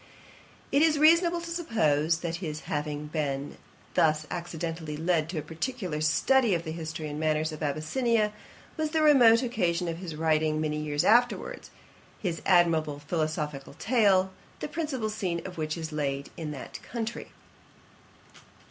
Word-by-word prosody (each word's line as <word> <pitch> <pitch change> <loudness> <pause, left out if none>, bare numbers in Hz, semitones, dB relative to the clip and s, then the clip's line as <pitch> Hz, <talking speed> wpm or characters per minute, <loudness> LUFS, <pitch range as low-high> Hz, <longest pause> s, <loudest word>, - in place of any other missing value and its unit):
It 280 - +4
is 315 -1 +4
reasonable 335 +3 +5
to 335 0 -7
suppose, 165 - +1
that 170 -1 -2
his 155 -4 -5
having 150 0 -3
been 145 -2 -3 0.4
thus 155 -1 +3
accidentally 165 -3 -4
led 165 -1 +1
to 170 - -4
a 155 - -2
particular 165 - -4
study 215 +8 +3
of 170 - -2
the 160 - -5
history 160 -1 -5
and 150 0 -5
manners 155 0 +1
of 155 - -8
Abyssinia, 210 - 0 0.4
was 310 -1 0
the 315 0 +1
remote 250 -6 +6
occasion 180 -8 0
of 165 0 -3
his 175 -4 -6
writing, 155 -1 +1
many 155 -1 -1
years 150 -1 -1
afterwards, 240 +2 +2 0.5
his 175 -5 -3
admirable 165 -5 +3
philosophical 150 -2 -3
tale, 200 -6 +3 0.3
the - - -3
principal 295 -8 -2
scene 185 -5 -2
of 180 -3 -7
which 155 +1 -2
is 160 -1 -5
laid 140 -2 -2
in 160 -2 -5
that 140 -3 -7
country. 230 0 -5
165 Hz, 150 wpm, -28 LUFS, 155-225 Hz, 0.5 s, remote